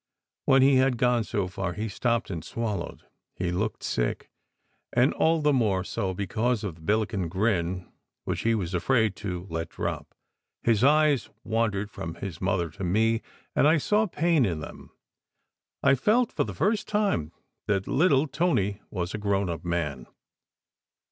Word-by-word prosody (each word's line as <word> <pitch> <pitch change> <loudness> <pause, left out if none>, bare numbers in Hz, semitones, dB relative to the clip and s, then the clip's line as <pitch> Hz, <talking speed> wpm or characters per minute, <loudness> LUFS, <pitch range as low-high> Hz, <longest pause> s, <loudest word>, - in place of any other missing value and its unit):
When 135 0 +5
he 135 0 +6
had 130 -1 +3
gone 125 -1 +2
so 100 -3 -2
far, 95 -1 -3
he 110 +5 -3
stopped, 115 +1 -1
and 80 -4 -4
swallowed. 105 -4 -4 0.3
He 90 -1 -2
looked 105 +5 -2
sick, - - -2 0.6
and 125 +4 +3
all 165 0 +2
the 150 -1 +4
more 105 -8 +2
so 95 -2 -3
because 110 +4 -1
of 100 -5 -3
the 80 - -18
Billiken 100 -1 0
grin 90 -2 0 0.4
which - - -2
he 115 0 +2
was 95 -4 -3
afraid 110 +3 +2
to 90 -4 -4
let 80 0 -3
drop. - - -5 0.5
His 115 -1 +3
eyes 150 -2 +4
wandered 110 -3 -1
from 80 0 -6
his 90 -2 -7
mother 90 -3 0
to 100 +5 -8
me, 110 +5 +2 0.3
and - - +5
I 160 +2 +5
saw 210 +8 +2
pain 165 -3 +2
in 85 -8 0
them. 80 - -9 0.9
I - - +6
felt 220 - +2
for - - 0
the - - -6
first 210 +1 +1
time 205 - 0 0.4
that 100 -2 0
little 145 -2 +3
Tony 120 - 0
was 90 -2 -3
a 110 - -3
grown 100 -3 0
up 85 - -6
man. 85 -6 -2
105 Hz, 165 wpm, -27 LUFS, 90-130 Hz, 0.9 s, he